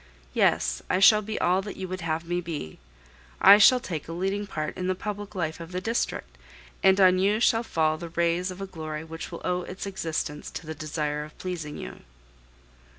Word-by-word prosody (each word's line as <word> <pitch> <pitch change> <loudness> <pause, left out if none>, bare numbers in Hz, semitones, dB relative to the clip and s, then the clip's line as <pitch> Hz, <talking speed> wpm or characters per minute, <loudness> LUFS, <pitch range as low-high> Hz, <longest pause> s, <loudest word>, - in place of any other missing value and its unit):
Yes, - - +2
I - - +2
shall 210 +2 +7
be 215 +1 -4
all 180 +2 +2
that 205 +1 -8
you 190 - -4
would 185 0 -5
have 165 0 -2
me. 170 - -4 0.6
I 205 - +9
shall 250 +5 +7
take 165 -10 -5
a 165 - -5
leading 195 +4 -2
part 155 -4 -4
in 185 - -3
the 185 - +1
public 205 +1 -6
life 160 -3 -2
of 165 +1 -9
the 180 - -2
district, 185 - -3 0.4
and 190 0 +5
on 185 -1 +6
you 205 +3 +2
shall 225 -1 +3
fall 155 -8 0
the 170 -1 -6
rays 170 +2 0
of 185 +1 -7
a - - -2
glory 155 -4 -6
which 160 0 -8
will - - -7
owe 180 0 0
its 185 +2 -7
existence 160 -6 -3
to - - -8
the 160 - -5
desire 150 -1 -3
of 150 - -13
pleasing 165 -5 -5
you." 60 - -8
180 Hz, 205 wpm, -26 LUFS, 155-195 Hz, 0.6 s, I